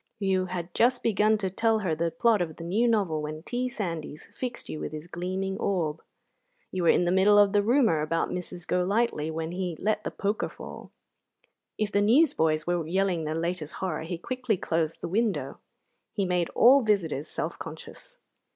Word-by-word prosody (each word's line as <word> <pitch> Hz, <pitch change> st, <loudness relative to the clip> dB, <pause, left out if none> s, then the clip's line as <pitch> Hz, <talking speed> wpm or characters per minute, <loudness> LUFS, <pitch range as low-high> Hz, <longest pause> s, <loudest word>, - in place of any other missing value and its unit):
You 190 Hz, -2 st, 0 dB
had 175 Hz, -1 st, -5 dB
just 245 Hz, +1 st, +2 dB
begun 215 Hz, 0 st, +3 dB
to 190 Hz, -3 st, -2 dB
tell 225 Hz, +3 st, +2 dB
her 165 Hz, -, +1 dB
the 165 Hz, +2 st, 0 dB
plot 230 Hz, -1 st, +2 dB
of 160 Hz, -3 st, -3 dB
the 165 Hz, -, -9 dB
new 205 Hz, +8 st, +1 dB
novel 195 Hz, -9 st, +1 dB
when 155 Hz, +1 st, -6 dB
T. 250 Hz, +5 st, -2 dB
Sandys 165 Hz, -9 st, -5 dB
fixed 250 Hz, -2 st, -5 dB
you 155 Hz, -, -5 dB
with -, -, -5 dB
his 155 Hz, +1 st, -6 dB
gleaming 185 Hz, +3 st, -3 dB
orb. 165 Hz, -5 st, -1 dB, 0.7 s
You 185 Hz, -, -2 dB
were 170 Hz, -, +3 dB
in 180 Hz, -, +4 dB
the 175 Hz, -, +1 dB
middle 195 Hz, +3 st, +5 dB
of 205 Hz, 0 st, +5 dB
the 205 Hz, -, +4 dB
rumour 225 Hz, -, +3 dB
about 165 Hz, +2 st, -1 dB
Mrs. 180 Hz, -1 st, -6 dB
Golightly 180 Hz, -3 st, 0 dB
when 160 Hz, +1 st, -3 dB
he 180 Hz, -2 st, -3 dB
let 215 Hz, 0 st, 0 dB
the -, -, -2 dB
poker 205 Hz, +1 st, -2 dB
fall. -, -, -10 dB, 0.9 s
If 215 Hz, -1 st, -1 dB
the 205 Hz, -, +2 dB
newsboys 205 Hz, -, +3 dB
were 175 Hz, -2 st, -1 dB
yelling 180 Hz, -2 st, 0 dB
the 155 Hz, +1 st, -2 dB
latest 170 Hz, -2 st, -3 dB
horror 185 Hz, -5 st, -3 dB
he 165 Hz, +2 st, -4 dB
quickly 250 Hz, +2 st, -2 dB
closed 165 Hz, -2 st, -1 dB
the -, -, -3 dB
window. 215 Hz, +4 st, -1 dB, 0.5 s
He 200 Hz, -, 0 dB
made 180 Hz, -2 st, 0 dB
all 265 Hz, +4 st, +7 dB
visitors 170 Hz, -, 0 dB
self -, -, -4 dB
conscious. -, -, -9 dB
185 Hz, 190 wpm, -27 LUFS, 165-215 Hz, 0.9 s, all